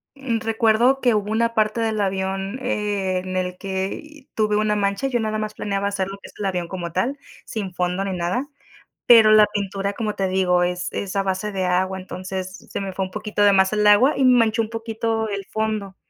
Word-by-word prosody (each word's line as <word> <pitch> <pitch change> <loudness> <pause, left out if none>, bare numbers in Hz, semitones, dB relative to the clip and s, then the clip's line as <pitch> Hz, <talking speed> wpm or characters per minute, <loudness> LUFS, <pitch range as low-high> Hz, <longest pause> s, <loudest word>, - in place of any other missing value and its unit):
mm, 265 -5 -2
recuerdo 225 +4 +2
que 245 -2 +3
hubo 210 0 -1
una 230 +1 +1
parte 215 +1 +1
del 220 -2 0
avión, 195 +3 -2
eh, 205 -6 -1
en 185 0 -4
el 180 0 -2
que 195 +11 -5
tuve 210 -1 +1
una 210 0 +1
mancha, 200 +5 0
yo 250 -3 0
nada 215 0 -1
más 215 0 -3
planeaba 200 -1 -2
hacer 195 -2 -2
lo 195 - -6
que - - -12
es - - -16
el 205 - -2
avión 180 -3 -1
como 175 -3 -5
tal, 240 +11 -1 0.3
sin 200 -5 -5
fondo 180 +2 -1
ni 195 - -2
nada, 180 +10 -1 0.6
pero 225 -3 +8
la 215 -1 +7
pintura, 200 -1 -2
como 215 -2 -3
te 195 - 0
digo, 180 -1 +2
es 180 0 -2
es 195 -1 -4
a 195 - +2
base 195 +2 -2
de 190 -1 -1
agua, 185 +1 0
entonces, 185 0 -6
se - - -3
me 195 -1 -4
fue 190 +1 -2
un 185 - -13
poquito 210 0 -2
de 205 - +6
más 190 0 +3
el 210 0 +2
agua 225 +8 +6
y 270 - +3
manchó 230 -3 +4
un 220 - -5
poquito 225 -1 -2
el 200 -2 -4
fondo, 215 -3 -2
205 Hz, 220 wpm, -22 LUFS, 190-220 Hz, 0.6 s, pero